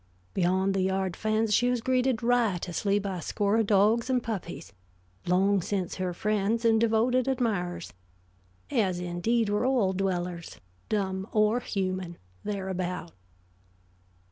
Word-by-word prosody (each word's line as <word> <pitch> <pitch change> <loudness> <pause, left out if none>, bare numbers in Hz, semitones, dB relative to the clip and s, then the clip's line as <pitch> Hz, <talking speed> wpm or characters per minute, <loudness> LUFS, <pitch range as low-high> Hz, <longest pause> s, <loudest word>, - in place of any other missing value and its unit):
Beyond 190 +2 +1
the 195 - +1
yard 190 -1 0
fence 215 0 0
she 245 +4 +3
was 250 -1 +1
greeted 255 -1 +1
riotously 205 -5 +1
by 195 -3 -3
a - - -7
score 205 +5 0
of 225 -2 +2
dogs 215 +5 +3
and 250 -2 +1
puppies, 175 - -5 0.5
long 190 +2 +3
since 185 0 -3
her 185 -1 -1
friends 210 +4 0
and 225 -1 +4
devoted 230 +3 +2
admirers; 200 -10 -1 0.8
as, 185 -5 +1
indeed, 180 +7 0
were 205 +2 0
all 245 -7 +2
dwellers, 180 -3 -3 0.3
dumb 190 -2 -1
or 215 +2 +3
human, 185 -6 -3 0.3
thereabout. 185 -4 -3
200 Hz, 130 wpm, -28 LUFS, 185-225 Hz, 0.8 s, and